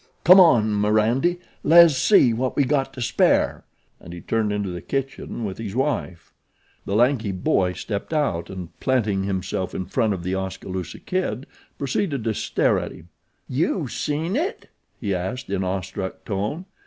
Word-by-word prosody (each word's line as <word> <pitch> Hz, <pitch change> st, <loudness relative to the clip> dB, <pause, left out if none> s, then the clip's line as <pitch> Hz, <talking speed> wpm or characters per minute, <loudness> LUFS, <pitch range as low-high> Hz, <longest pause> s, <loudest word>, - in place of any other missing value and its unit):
Come 185 Hz, +3 st, +9 dB
on 120 Hz, -, +5 dB
M'randy, 110 Hz, +11 st, +2 dB, 0.3 s
les 170 Hz, -1 st, +7 dB
see 130 Hz, -, +5 dB
what 125 Hz, +3 st, -2 dB
we 140 Hz, -, +3 dB
got 135 Hz, 0 st, 0 dB
to 125 Hz, -, -3 dB
spare," -, -, +2 dB, 0.3 s
and 85 Hz, -, -11 dB
he 85 Hz, -, -7 dB
turned 110 Hz, -2 st, 0 dB
into 100 Hz, -2 st, -2 dB
the 90 Hz, -, -6 dB
kitchen 135 Hz, -4 st, -4 dB
with 95 Hz, 0 st, -5 dB
his 110 Hz, -2 st, -5 dB
wife. 125 Hz, -, -2 dB, 0.5 s
The 100 Hz, -, -2 dB
lanky 120 Hz, -2 st, +2 dB
boy 90 Hz, 0 st, +1 dB
stepped 100 Hz, -, -5 dB
out, 135 Hz, -, -1 dB
and 90 Hz, -3 st, -7 dB
planting 110 Hz, -7 st, 0 dB
himself 95 Hz, -1 st, -3 dB
in 95 Hz, -, -3 dB
front 105 Hz, +2 st, 0 dB
of 85 Hz, -, -7 dB
The 90 Hz, +1 st, -2 dB
Oskaloosa 95 Hz, -1 st, -4 dB
Kid 140 Hz, -, -3 dB, 0.3 s
proceeded 140 Hz, -, -1 dB
to 110 Hz, -1 st, 0 dB
stare -, -, +1 dB
at -, -, -5 dB
him. 85 Hz, -, -14 dB, 0.4 s
"Yew 155 Hz, +3 st, 0 dB
seen 155 Hz, -, -2 dB
it?" 355 Hz, -, -3 dB, 0.3 s
he 100 Hz, -4 st, -2 dB
asked 100 Hz, +7 st, -4 dB
in 95 Hz, -1 st, 0 dB
awestruck 95 Hz, +1 st, -4 dB
tone. 105 Hz, -, -3 dB
110 Hz, 165 wpm, -23 LUFS, 95-135 Hz, 0.5 s, Come